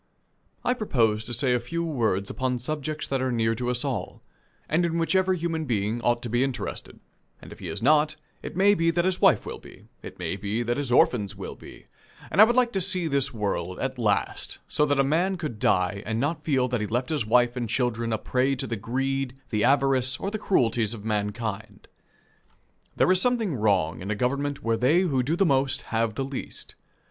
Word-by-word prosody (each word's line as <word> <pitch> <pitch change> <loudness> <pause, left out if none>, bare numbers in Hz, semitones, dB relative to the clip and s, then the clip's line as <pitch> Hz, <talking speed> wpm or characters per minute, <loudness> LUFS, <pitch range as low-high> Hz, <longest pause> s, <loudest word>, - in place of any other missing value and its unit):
I 250 - +3
propose 115 - +1
to - - -8
say 125 +2 +1
a 125 - +2
few 165 +8 -3
words 115 - -1
upon 130 -1 -1
subjects 155 +4 -4
that 135 -1 -1
are 130 0 0
near 115 -1 +1
to 120 +2 -3
us 125 +3 -2
all, 130 -5 -4 0.4
and 165 +3 +1
in 170 -1 0
which 165 +3 0
every 190 0 +3
human 165 -1 -2
being 110 -1 -1
ought 120 0 +1
to 120 - -4
be 120 +3 +2
interested 135 -2 -5 0.4
and - - -13
if - - -17
he - - -7
is - - -5
not, 150 +2 +4 0.3
it - - -7
may 200 +2 +5
be 165 -4 +2
that 170 +1 +1
his 185 -1 0
wife - - +4
will - - -6
be, - - -16
it - - -10
may 95 - -3
be 105 +4 -2
that 120 +2 -1
his 140 -4 -2
orphans 105 -5 +3
will 100 - -6
be; - - -14 0.5
and 190 - +5
I - - +11
would 240 +2 +1
like 250 -2 +3
to 195 - -1
see 180 -2 +1
this 140 -2 +1
world, 100 -5 -3
at 130 -1 -3
last, 105 -5 -1
so 150 - +2
that 145 -1 +1
a - - +5
man 175 +7 +1
could 150 -10 -5
die 90 +1 +1
and 110 +1 -2
not 150 +4 -1
feel 135 -5 +1
that 125 -3 -1
he 105 - -2
left 125 +6 -1
his 150 -9 -1
wife 120 +2 +3
and 120 -3 -3
children 120 -2 -1
a 110 - +1
prey 130 +5 0
to 135 - -2
the 115 -2 -3
greed, 135 +4 -2 0.2
the 105 -2 +1
avarice, 135 -2 +2
or 195 - -4
the 215 - -3
cruelties 115 - +1
of 105 -1 -11
mankind. 110 0 -3 1.1
There - - +3
is 185 0 +3
something 235 -8 +1
wrong 95 - +1
in 95 - -6
a 105 - 0
government 140 +5 -1
where 115 0 +1
they 140 +10 +3
who 145 -9 +1
do 145 +7 0
the 195 - +2
most 135 -2 +1
have 115 -1 0
the 135 - -2
least. 135 -1 -7
130 Hz, 220 wpm, -26 LUFS, 115-155 Hz, 1.1 s, I